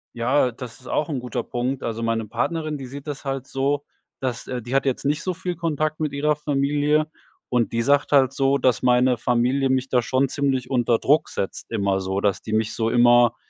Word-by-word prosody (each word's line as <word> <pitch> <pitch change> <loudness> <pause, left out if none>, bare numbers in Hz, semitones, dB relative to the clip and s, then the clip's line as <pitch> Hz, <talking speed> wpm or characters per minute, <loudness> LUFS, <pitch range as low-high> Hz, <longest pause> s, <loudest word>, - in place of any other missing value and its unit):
Ja, 125 +2 +2
das 120 0 -9
ist 125 - -14
auch 150 - 0
'n 140 -4 -2
guter 125 0 -4
Punkt. 125 +2 -3
Also, 115 0 -3
meine 115 -1 -1
Partnerin, 155 +7 -2
die 130 - -7
sieht 140 +2 -9
das 145 -1 -6
halt 135 -1 -3
so, 140 +2 -1 0.3
dass 125 -3 -3
äh, 125 -1 -4
die 120 +3 -7
hat 135 - +2
jetzt 135 0 -1
nicht 150 +2 +1
so 185 - -1
viel 180 +1 -4
Kontakt 155 -2 -1
mit 155 -2 -2
ihrer 150 +2 +1
Familie, 145 +1 +1 0.4
und 120 -2 +1
die 115 - +1
sagt 140 +4 +2
halt 135 -3 +5
so, 135 0 +2
dass 125 -2 +2
meine 125 0 +4
Familie 125 +3 +1
mich 130 0 0
da 125 - +3
schon 130 +3 +1
ziemlich 135 -3 -1
unter 120 -3 +2
Druck 150 +3 +2
setzt 95 - -5
immer 100 -3 0
so, 95 +1 -2
dass 100 -2 +1
die 110 - -5
mich 110 0 0
so 115 -1 0
immer, 120 -1 +5
130 Hz, 220 wpm, -23 LUFS, 120-145 Hz, 0.4 s, halt